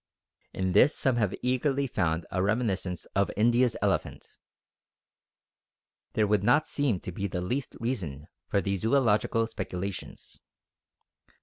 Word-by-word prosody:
In 95 -1 -1
this 140 - +5
some 130 -3 +1
have 105 -5 +1
eagerly 135 +2 +1
found 80 -9 -1
a 95 - 0
reminiscence 100 -4 -1
of 100 0 +2
India's 120 +2 +3
elephant. - - -1 1.9
There 110 - +2
would 105 -1 +1
not 145 +8 +4
seem 135 -10 0
to - - -5
be 100 +3 -3
the 90 - -3
least 125 +10 -3
reason 85 - -3 0.2
for 100 - +1
these 100 -1 -2
zoological 115 -2 +2
speculations. 100 -4 -6
105 Hz, 125 wpm, -28 LUFS, 95-125 Hz, 1.9 s, this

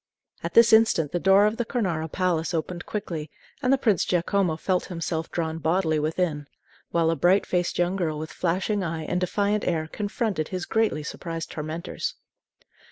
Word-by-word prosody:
At - - -4
this 230 -1 +7
instant 220 -9 +4
the 175 - 0
door 195 +3 +5
of 215 +2 +1
the 240 - 0
Cornaro 175 - -2
Palace 175 -3 0
opened 175 +2 -4
quickly, 170 -7 -4 0.3
and 250 - +2
the 270 - +5
Prince 215 -9 +2
Giacomo 180 -1 +1
felt 180 +2 0
himself 165 -2 -3
drawn 160 -1 -2
bodily 160 -1 +1
within; 155 -1 -1 0.4
while 165 -1 +2
a - - 0
bright 180 +6 +3
faced 175 -1 -1
young 175 +2 +1
girl 160 -5 -1
with 155 +1 -6
flashing 190 +4 0
eye 165 -2 -3
and 180 +3 -1
defiant 205 +3 0
air 160 -3 0
confronted 205 -2 -2
his 185 -1 -4
greatly 220 -9 +1
surprised 165 +1 -5
tormentors. 155 +2 -4
175 Hz, 170 wpm, -25 LUFS, 160-200 Hz, 0.4 s, this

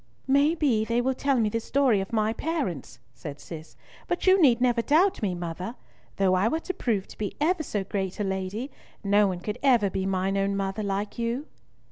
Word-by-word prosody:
"May 280 +4 +3
be 255 -10 +2
they 230 +2 0
will 260 +2 +1
tell 270 0 +1
me 220 - +2
the 230 - -1
story 245 -3 +2
of 195 - -6
my 220 -1 +1
parents," 190 - -3 0.2
said 145 +2 -8
Cis; 160 +1 -10 0.3
"but 350 - -2
you 375 0 +5
need 250 -6 +5
never 245 -1 +2
doubt 330 +10 +3
me, 190 -4 -1
mother. 175 +6 -5 0.4
Though 195 -1 +2
I 185 +4 +3
were 320 +7 0
to 370 - -4
prove 215 - -1
to - - -13
be 205 -2 -3
ever 330 +3 +2
so 210 -9 -2
great 190 -1 -3
a - - +1
lady, 190 +7 -3 0.3
no 205 +1 +4
one 180 -2 -3
could 210 +3 -4
ever 240 -8 +3
be 190 +1 -2
mine 195 +1 0
own 200 0 0
mother 195 +2 -2
like 200 +2 -3
you!" 235 +5 -2
215 Hz, 210 wpm, -26 LUFS, 195-265 Hz, 0.4 s, you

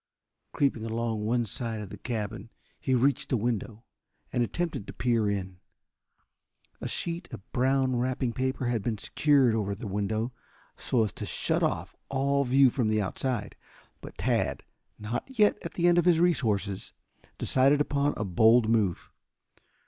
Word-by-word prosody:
Creeping 135 -6 0
along 115 -1 -2
one 120 +1 +1
side 115 +1 -3
of 105 -2 -7
the 105 - -7
cabin 110 -3 -4 0.3
he 130 - +1
reached 135 +2 +1
a 125 - +3
window 115 0 -3 0.5
and 120 - +1
attempted 160 - -2
to - - -7
peer 115 -4 +1
in. 95 -2 -4 1.2
A - - -3
sheet 170 +1 -4
of 110 -4 -10
brown 130 0 +2
wrapping 125 0 -1
paper 130 +2 -1
had 120 -2 0
been 110 +1 -2
secured 140 +1 +3
over 100 -3 -1
the 105 - -8
window 110 +4 -2 0.4
so 120 -4 +1
as 105 - -3
to - - -6
shut - - 0
off - - -1
all 140 +1 +1
view 135 0 +5
from 120 -3 0
the 110 0 +2
outside. 105 +2 -2 0.5
But - - -11
Tad, - - 0 0.3
not 120 - -5
yet 210 -1 +4
at - - -7
the 175 0 +2
end 175 0 +5
of 175 - +1
his 175 -2 +5
resources, 110 - 0 0.4
decided 135 +2 +3
upon 145 0 +1
a 105 - -2
bold 110 +5 +5
move. 105 -6 0
120 Hz, 160 wpm, -28 LUFS, 110-135 Hz, 1.2 s, view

